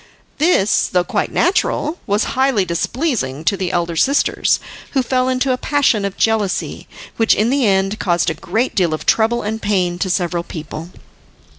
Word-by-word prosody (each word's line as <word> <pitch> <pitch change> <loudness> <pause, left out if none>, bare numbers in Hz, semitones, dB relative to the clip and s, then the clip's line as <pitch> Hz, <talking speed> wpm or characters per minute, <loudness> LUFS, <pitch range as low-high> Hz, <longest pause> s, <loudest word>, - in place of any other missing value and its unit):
This, 295 - +3
though 180 -1 +1
quite - - -2
natural, 345 -2 0
was 205 +2 +1
highly 260 -7 +2
displeasing 190 - -2
to 200 - +2
the 185 -2 -3
elder 170 -1 -1
sisters, 280 - +2 0.3
who 265 -2 +2
fell 255 0 0
into 255 +1 +1
a 250 - -1
passion 270 -8 +1
of 195 - -4
jealousy, 220 -4 -1 0.3
which 225 -1 +4
in 220 +4 +1
the 270 -4 +2
end 195 +2 +1
caused 175 -2 +1
a - - -2
great 190 - -2
deal 170 -5 +1
of - - -9
trouble 230 +2 +2
and 220 +1 -3
pain 180 -4 0
to 190 - -1
several 175 -1 0
people. 160 0 -8
205 Hz, 170 wpm, -18 LUFS, 175-255 Hz, 0.3 s, which